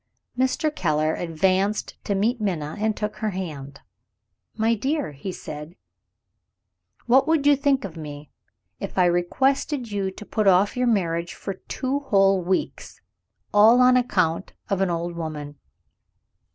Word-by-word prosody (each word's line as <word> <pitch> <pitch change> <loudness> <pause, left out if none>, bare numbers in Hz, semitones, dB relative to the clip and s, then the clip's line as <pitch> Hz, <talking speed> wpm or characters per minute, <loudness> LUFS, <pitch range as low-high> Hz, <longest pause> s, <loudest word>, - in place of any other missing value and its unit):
Mr. 260 +4 0
Keller 155 -3 +1
advanced 185 +5 0
to 200 - 0
meet 225 +4 0
Minna, 160 -7 -2
and 215 0 0
took 210 0 -3
her 215 - -1
hand. 150 -8 -6 0.7
"My 225 +1 +2
dear," 270 - -1
he 145 +7 -6
said, 150 -1 -8 1.3
"what 265 +4 +4
would 315 -3 +2
you 290 0 +6
think 275 -4 +1
of 180 -4 -8
me, 150 -2 -9 0.5
if - - -6
I 180 - +5
requested 245 - 0
you 200 -2 -1
to 200 +3 -10
put 215 -1 -1
off 190 +2 +4
your 250 0 +1
marriage 170 -6 0
for 195 - -5
two 260 +8 -3
whole 195 -8 +3
weeks 185 +2 -2
and - - -36 0.5
all 220 +4 +7
on 255 0 +6
account 185 -8 0 0.2
of 195 -1 +1
an 190 - +2
old 170 0 -3
woman?" 150 -3 -6
195 Hz, 150 wpm, -24 LUFS, 170-240 Hz, 1.3 s, all